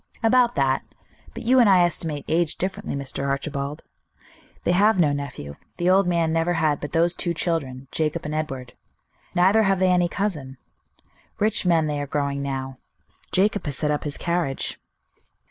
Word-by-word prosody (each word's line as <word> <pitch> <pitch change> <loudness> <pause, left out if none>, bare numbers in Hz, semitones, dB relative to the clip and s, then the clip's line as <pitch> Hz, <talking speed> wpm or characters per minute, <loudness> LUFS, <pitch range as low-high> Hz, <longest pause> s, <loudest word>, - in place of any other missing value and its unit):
"About 240 +1 +4
that. 135 -1 +1 0.5
But 230 - -6
you 255 +3 +4
and 235 -4 +6
I 185 -2 +6
estimate 160 -4 -2
age 165 0 +1
differently, 185 -4 -3
Mr. 140 0 -3
Archibald. 140 +1 -3 0.8
They - - +2
have 200 +2 +4
no 155 -4 +4
nephew; 135 - -5 0.2
the 175 +1 +2
old 190 0 +4
man 170 -2 +1
never 165 +2 +1
had 155 -3 +1
but 145 - -5
those 170 +1 +3
two 170 -1 -2
children, 140 -6 -2
Jacob 160 +1 -2
and 150 - -3
Edward. 135 -6 -4 0.6
Neither 190 +5 +5
have 195 -2 +2
they 185 0 +3
any 175 -1 +3
cousin. 150 -11 -3 0.8
Rich 210 -3 +1
men 165 -3 +3
they 150 -1 -2
are 145 - -4
growing 140 0 -1
now. 135 -1 -4 0.5
Jacob 200 +3 +2
has 140 - 0
set 150 -1 +1
up 150 - -1
his 145 -1 -4
carriage." 170 -6 -1
160 Hz, 170 wpm, -24 LUFS, 140-180 Hz, 0.8 s, and